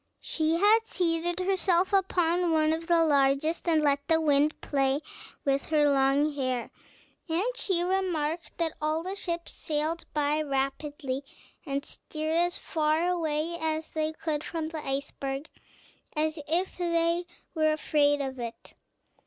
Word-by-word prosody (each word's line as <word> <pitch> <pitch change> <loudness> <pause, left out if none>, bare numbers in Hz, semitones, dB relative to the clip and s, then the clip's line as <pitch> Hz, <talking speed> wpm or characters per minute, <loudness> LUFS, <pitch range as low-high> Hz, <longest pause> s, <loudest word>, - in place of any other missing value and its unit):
She 320 0 0
had 430 +5 +4
seated 345 -1 0
herself 375 0 +2
upon 355 -2 +2
one 310 0 +3
of 330 +1 -4
the 335 -2 +4
largest, 285 +3 +2
and 315 -2 +3
let 280 -1 +1
the 325 0 +4
wind 300 -1 +2
play 275 0 +1 0.4
with 275 0 +1
her 300 -2 +3
long 280 +2 +3
hair, 255 -4 -2 0.6
and 335 +5 +1
she 365 -7 0
remarked 350 -4 -1
that 330 -2 0
all 310 +2 0
the 375 +2 -3
ships 340 -3 -4
sailed 310 +2 -2
by 300 0 +1
rapidly, 275 -1 -2 0.4
and 280 0 -2
steered 310 +1 -4
as 350 +1 +2
far 315 +2 0
away 325 -1 -1
as 315 0 -2
they 310 0 -1
could 310 -1 -3
from 320 -2 -3
the 315 -2 -5
iceberg, 275 +1 -3 0.7
as 310 +1 0
if 350 +5 0
they 340 0 +1 0.3
were 310 -2 +2
afraid 290 -2 +2
of 265 -2 -4
it. 235 -1 -7
315 Hz, 145 wpm, -28 LUFS, 290-340 Hz, 0.7 s, had